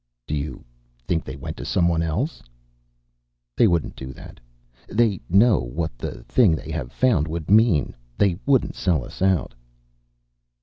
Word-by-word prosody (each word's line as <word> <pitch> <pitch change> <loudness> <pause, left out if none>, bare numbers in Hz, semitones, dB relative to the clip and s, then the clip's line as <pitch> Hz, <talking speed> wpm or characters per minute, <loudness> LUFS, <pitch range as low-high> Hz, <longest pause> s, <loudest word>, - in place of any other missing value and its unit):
"You 75 -2 -4 0.4
think 80 +2 0
they 65 - -7
went 70 - -7
to - - -6
someone 85 -2 +1
else?" 100 - -2 1.1
"They 115 - +5
wouldn't 85 -4 0
do 65 0 -7
that. - - -13 0.5
They 105 -4 +1
know 100 +3 +5
what 70 +4 -4
the - - -6
thing 105 -11 +3
they 80 - -7
have 70 -6 -4
found 105 - +2
would 80 +2 -4
mean. 105 -8 +4 0.2
They 95 -3 +2
wouldn't 135 -3 +3
sell 80 -9 0
us - - -12
out." 95 -6 +1
85 Hz, 145 wpm, -23 LUFS, 75-105 Hz, 1.1 s, They